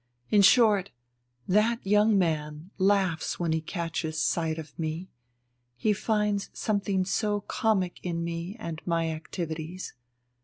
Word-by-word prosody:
In 205 - +6
short, 205 -3 +5 0.6
that 215 +4 +2
young 210 +1 +4
man 155 -1 -1
laughs 190 -4 +1
when 170 -2 0
he 160 0 +1
catches 165 -2 -3
sight 160 0 0
of 155 -2 -8
me, 165 +3 -3 0.7
he 215 - +2
finds 210 -1 0
something 200 -3 0
so 205 +1 0
comic 195 -6 0
in 170 -2 -2
me 170 +3 -4
and 165 -6 -5
my 165 -1 +1
activities. 160 +2 -5
180 Hz, 125 wpm, -28 LUFS, 160-205 Hz, 0.7 s, In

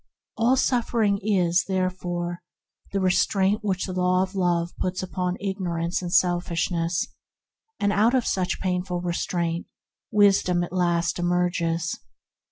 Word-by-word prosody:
All 230 +3 +3
suffering 230 -5 +1
is, 180 -4 +2
there 185 -1 0
fore, 175 -1 -4 0.5
the 195 - 0
restraint 190 +2 +2
that 195 -3 -1
the 185 - -5
Law 180 -1 +1
puts 185 0 -2
upon 180 0 -2
ignorance 180 -4 -2
and 175 -1 -4
selfishness: 175 -1 +1 0.7
out 205 +4 +3
of 255 - +1
such 185 -2 -1
painful 180 -1 -1
restraint 170 -1 -2 0.4
Wisdom 195 -4 +4
at 175 - -6
last 175 -1 +1
emerges. 175 -1 0
180 Hz, 115 wpm, -25 LUFS, 175-195 Hz, 0.7 s, Wisdom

